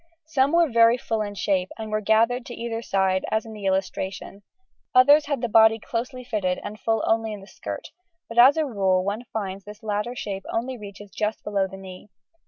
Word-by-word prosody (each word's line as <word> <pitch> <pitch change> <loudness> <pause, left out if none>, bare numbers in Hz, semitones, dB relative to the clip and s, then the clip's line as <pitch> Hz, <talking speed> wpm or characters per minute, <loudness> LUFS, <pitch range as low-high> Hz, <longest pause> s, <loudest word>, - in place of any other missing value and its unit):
Some 280 -3 +2
were 340 -1 +5
very 230 -1 +5
full 225 -3 -2
in 205 -1 -4
shape, 190 -2 0
and 220 -1 -6
were 215 0 0
gathered 225 +4 +2
to 240 - -7
either 230 -1 -4
side 190 -3 +1
as 220 +1 0
in 220 - -9
the 205 -2 -5
illustration; 190 +1 -3 0.5
others 285 +4 +6
had 285 -2 -1
the 240 - 0
body 220 0 +6
closely 245 +3 -5
fitted 205 -7 -1
and 210 +1 -7
full 225 -1 0
only 225 0 +1
in 205 - -8
the - - -12
skirt, - - -7 0.4
but 230 +1 -1
as 265 +5 +8
a 315 - +2
rule 190 -7 +1
one 210 +5 -3
finds 195 -3 -4
this 210 +3 -12
latter 210 +3 -2
shape 195 -5 -5
only 250 +3 -2
reaches 205 -2 -11
just 215 0 -2
below 200 -2 0
the 195 +1 -10
knee. 190 +1 -11
220 Hz, 205 wpm, -24 LUFS, 200-235 Hz, 0.5 s, as